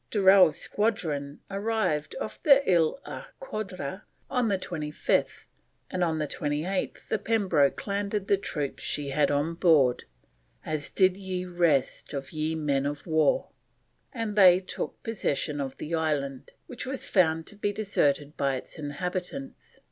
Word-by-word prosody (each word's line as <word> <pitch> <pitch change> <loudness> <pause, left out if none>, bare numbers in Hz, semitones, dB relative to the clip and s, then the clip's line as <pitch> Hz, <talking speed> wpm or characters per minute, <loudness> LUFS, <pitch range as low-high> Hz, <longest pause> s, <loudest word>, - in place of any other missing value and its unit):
Durell's 190 -6 +6
squadron 155 -10 -2
arrived 205 - -1
off - - -5
the 280 -3 +5
Ile 170 - +3
aux - - -7 0.2
Coudres 190 - -5 0.3
on 250 -3 +2
the 200 -2 +2
25th, 155 -5 -1 0.5
and 180 - 0
on 160 -2 +1
the 155 - 0
28th 150 +7 -2
the - - 0
Pembroke 185 -11 +2
landed 200 0 -1
the 200 - +5
troops 150 -7 -4
she 145 -1 -2
had 145 +1 +2
on 145 +3 0
board, 155 -8 +3 0.6
"as 155 -2 -2
did 185 -1 +3
ye 185 -2 -4
rest 170 -8 +1
of 135 -1 -5
ye 155 +1 -1
men 140 -3 0
of 145 0 -5
warr," 155 -3 +2 0.6
and 225 -4 -3
they 185 -3 +8
took 185 - -6
possession 150 -9 -1
of 135 -1 -5
the 160 - -6
island, 145 -5 -1
which 255 0 -6
was 265 0 -2
found 165 -4 +2
to 210 - -8
be 205 0 -1
deserted 150 -8 0
by 140 -1 0
its 130 - -7
inhabitants. 180 - -5
170 Hz, 150 wpm, -27 LUFS, 145-200 Hz, 0.6 s, they